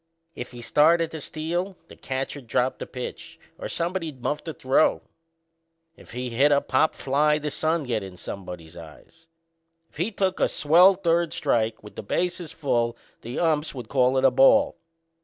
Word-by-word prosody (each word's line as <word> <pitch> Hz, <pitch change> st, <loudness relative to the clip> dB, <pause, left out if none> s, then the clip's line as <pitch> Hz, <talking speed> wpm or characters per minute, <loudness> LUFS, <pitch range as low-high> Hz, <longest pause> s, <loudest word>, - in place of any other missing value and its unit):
If 120 Hz, -, -7 dB
he 120 Hz, -1 st, -10 dB
started 165 Hz, +6 st, +3 dB
to 160 Hz, -, -7 dB
steal 175 Hz, +6 st, -3 dB
the -, -, -13 dB
catcher'd 135 Hz, 0 st, -5 dB
drop 125 Hz, +3 st, 0 dB
the -, -, -6 dB
pitch 125 Hz, -1 st, -8 dB, 0.2 s
or -, -, -4 dB
somebody'd 170 Hz, -5 st, -3 dB
muff 150 Hz, -, -2 dB
the 165 Hz, -, -5 dB
throw. 135 Hz, +1 st, +2 dB, 0.9 s
If -, -, -16 dB
he 125 Hz, 0 st, -4 dB
hit 140 Hz, +6 st, +3 dB
a 140 Hz, -, +5 dB
pop 140 Hz, +3 st, +1 dB
fly 150 Hz, +3 st, +2 dB
the 150 Hz, 0 st, -4 dB
sun'd 160 Hz, 0 st, -1 dB
get 115 Hz, -4 st, -1 dB
in 95 Hz, -2 st, -9 dB
somebody's 90 Hz, -4 st, -8 dB
eyes. 85 Hz, -, -14 dB, 0.6 s
If -, -, -19 dB
he 175 Hz, +7 st, 0 dB
took 190 Hz, -3 st, -1 dB
a -, -, +3 dB
swell 175 Hz, +6 st, +5 dB
third 170 Hz, -3 st, +1 dB
strike 115 Hz, -7 st, 0 dB
with 105 Hz, -, -12 dB
the -, -, -5 dB
bases 175 Hz, -, -2 dB
full 120 Hz, -7 st, -1 dB, 0.2 s
the 120 Hz, +3 st, -6 dB
umps 155 Hz, -3 st, 0 dB
would 120 Hz, -4 st, -8 dB
call 130 Hz, -1 st, +2 dB
it 130 Hz, -, +2 dB
a 135 Hz, -, +6 dB
ball. 275 Hz, -, +5 dB
145 Hz, 175 wpm, -25 LUFS, 125-165 Hz, 0.9 s, a